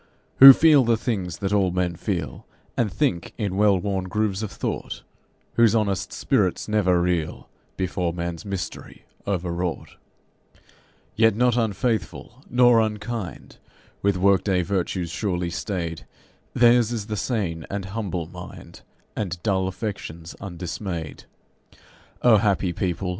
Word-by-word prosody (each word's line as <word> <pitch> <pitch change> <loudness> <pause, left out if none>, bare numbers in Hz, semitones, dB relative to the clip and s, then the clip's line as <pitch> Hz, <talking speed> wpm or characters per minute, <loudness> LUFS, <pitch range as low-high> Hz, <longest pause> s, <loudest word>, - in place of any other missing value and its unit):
Who 135 +1 +13
feel 150 -2 +5
the 115 -1 +2
things 95 -8 -3
that 100 0 -2
all 100 -3 +3
men 90 -1 -1
feel, - - -4 0.3
And 110 -4 0
think 90 - -1
in 100 -5 -2
well 100 -1 +4
worn 95 0 -2
grooves 105 +1 -1
of 110 - -4
thought, - - -5 0.5
Whose 115 -1 +5
honest 100 -3 0
spirits 105 -10 0
never 100 -5 +2
reel 85 -3 -2 0.3
Before 90 -2 -1
man's 85 0 -5
mystery, 100 -4 -6 0.2
overwrought. 90 -2 -3 1.2
Yet 115 -1 +4
not 125 +1 +2
unfaithful 110 -4 -2
nor 120 -1 +5
unkind, 110 -3 -5 0.4
with 100 -1 +1
work 95 +1 +3
day 95 -3 +1
virtues 90 -2 -2
surely 90 -3 -2
staid, 85 -5 -4 0.5
Theirs 120 -1 +5
is 110 -4 -3
the 105 0 -4
sane 95 -7 -2
and 100 -1 -4
humble 95 -4 -4
mind, - - -11 0.3
And 95 -4 -3
dull 95 -3 +1
affections 90 -4 -6
undismayed. 85 -3 -6 1.0
O 120 -3 +7
happy 100 -3 +1
people! 90 +1 -2
95 Hz, 130 wpm, -24 LUFS, 90-110 Hz, 1.2 s, Who